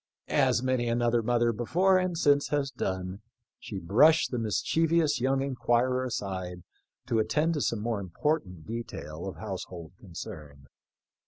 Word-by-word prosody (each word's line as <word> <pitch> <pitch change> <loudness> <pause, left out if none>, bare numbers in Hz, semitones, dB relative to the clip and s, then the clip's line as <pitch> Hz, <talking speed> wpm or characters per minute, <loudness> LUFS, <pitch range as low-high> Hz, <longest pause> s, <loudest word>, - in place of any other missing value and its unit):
" - - -48 0.2
As 120 - +1
many 130 -2 +1
another 120 0 +2
mother 120 0 +2
before 180 - +3
and 185 -2 -1
since 145 -3 +3
has 140 -2 -1
done, 95 -1 -4 0.4
she 100 - -7
brushed 135 - +4
the 125 - -1
mischievous 155 - +1
young 135 +1 +2
inquirer 130 -1 +1
aside 95 -7 -4 0.4
to 120 -3 +1
attend 150 +10 +1
to 150 - -2
some 115 -4 0
more 115 -1 -1
important 95 - -2
detail 95 -8 -6
of 95 - -5
household 90 -5 -7
concern. 80 -7 -9
120 Hz, 145 wpm, -28 LUFS, 95-140 Hz, 0.4 s, brushed